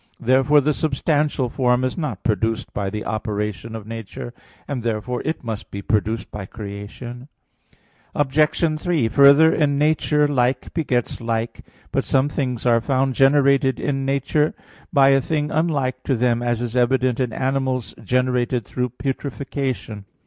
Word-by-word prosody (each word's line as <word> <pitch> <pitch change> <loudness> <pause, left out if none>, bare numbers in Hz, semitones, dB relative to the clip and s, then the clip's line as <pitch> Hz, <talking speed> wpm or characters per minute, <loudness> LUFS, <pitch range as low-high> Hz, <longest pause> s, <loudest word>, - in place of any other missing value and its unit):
Therefore 135 +4 +4
the 150 +2 +1
substantial 145 -2 0
form 125 0 +1
is 130 - -1
not 140 - -4
produced 115 +2 -1
by 100 -1 -2
the 105 +2 -5
operation 105 0 -3
of 110 -2 -7
nature; 115 +1 -7 0.3
and 135 -4 -3
therefore 115 +2 -2
it 160 -1 -2
must 110 -3 -5
be 100 0 -7
produced 110 0 -1
by 100 -3 -6
creation. 110 +5 -8 0.9
Obj. 150 +2 +1
3: 165 -10 +1
Further, 140 +5 +6
in 145 -2 +1
nature 150 0 +2
like 125 -2 0
begets 130 -9 -1
like. 115 0 -3 0.3
But - - 0
some 135 +2 +2
things 125 -5 -3
are 115 -1 +4
found 135 +1 +1
generated 135 0 +3
in 135 -2 -1
nature 140 +3 0 0.4
by 140 -5 +5
a 135 0 +4
thing 150 +2 -1
unlike 140 -6 0
to 135 - +1
them; 120 0 +1
as 120 -1 -1
is 120 0 -4
evident 125 0 +2
in 125 -3 0
animals 130 -1 -1
generated 125 0 0
through 125 +3 -2
putrefaction. 135 -5 -4
130 Hz, 150 wpm, -21 LUFS, 115-140 Hz, 0.9 s, Further